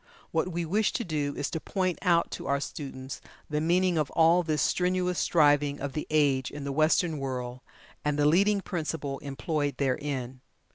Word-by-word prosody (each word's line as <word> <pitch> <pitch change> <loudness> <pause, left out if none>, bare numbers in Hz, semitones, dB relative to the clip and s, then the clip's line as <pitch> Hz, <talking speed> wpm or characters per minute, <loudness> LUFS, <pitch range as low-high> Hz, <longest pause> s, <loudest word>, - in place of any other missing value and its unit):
What 160 - +1
we 170 0 -2
wish 205 +6 +1
to 235 - -1
do 150 -5 -2
is 145 - -2
to 160 - -2
point 185 +1 -1
out 170 -3 +2
to - - -6
our 140 0 +1
students 135 -3 -6 0.3
the 150 0 0
meaning 175 +1 +2
of 150 - 0
all 165 +2 +5
this 155 -3 -1
strenuous 180 0 +1
striving 145 -3 +3
of 140 -1 -4
the 150 - -4
age, 140 -4 +2
in 145 -1 -7
the 140 - -3
Western 155 +2 +2
world, 125 -2 -4 0.4
and 150 -1 0
the 145 - +3
leading 200 +6 +4
principle 155 -6 -3
employed 145 +1 -2
therein. 130 -2 -2
150 Hz, 180 wpm, -28 LUFS, 140-170 Hz, 0.4 s, all